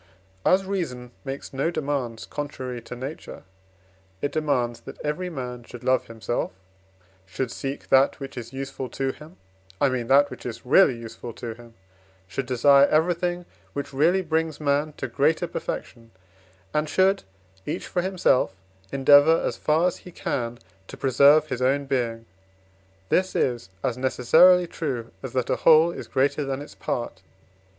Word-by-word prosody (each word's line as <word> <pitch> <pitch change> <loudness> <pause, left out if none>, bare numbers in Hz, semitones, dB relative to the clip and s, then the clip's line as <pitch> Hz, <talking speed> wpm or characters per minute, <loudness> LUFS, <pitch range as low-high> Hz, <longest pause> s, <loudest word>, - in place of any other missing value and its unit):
As 190 +1 +3
reason 130 -11 -4
makes 135 0 -6
no 135 +5 0
demands 140 -8 -3
contrary 130 -4 -5
to 115 +2 -8
nature, 135 +5 -8 0.8
it 145 - -2
demands, 125 -7 0
that - - -11
every 180 +5 -2
man 125 -6 -6
should 120 0 -11
love 130 0 +2
himself, 115 +1 -3 0.8
should 115 +6 -3
seek 135 +3 -5
that 135 +3 +4
which 135 -1 -7
is 120 -2 -7
useful 135 -1 -5
to 135 +3 -2
him 155 +6 -14 0.4
I 140 - +4
mean, 125 -3 -2
that 140 +2 +5
which - - -9
is 115 -1 -7
really 130 -1 +5
useful 115 +1 -8
to 115 0 -6
him, 115 0 -16 0.5
should 135 +5 -4
desire 140 +3 +5
everything 175 +2 +1 0.3
which 140 0 -5
really 170 +7 +3
brings 160 -2 -1
man 150 +1 0
to 130 - -5
greater 150 +8 +1
perfection, 115 -8 -6 0.6
and 150 0 0
should, 190 +4 +3 0.5
each - - -3
for 180 - -1
himself, 180 - +1 0.4
endeavour 145 +4 +6
as - - -1
far 155 +3 +2
as 180 - 0
he 180 - -13
can 120 -7 -3 0.3
to - - -10
preserve 140 +4 +5
his 125 - -3
own 140 +2 +2
being. 115 -4 -2 0.8
This 185 0 +1
is 120 -7 0
as 125 0 -1
necessarily 165 +8 +5
true, 135 -9 -4
as 130 -3 -7
that 130 -2 0
a - - +1
whole 160 +1 +6
is - - -8
greater 140 +3 +1
than 135 -1 -3
its - - -13
part. 120 -6 -4
135 Hz, 160 wpm, -25 LUFS, 125-155 Hz, 0.8 s, endeavour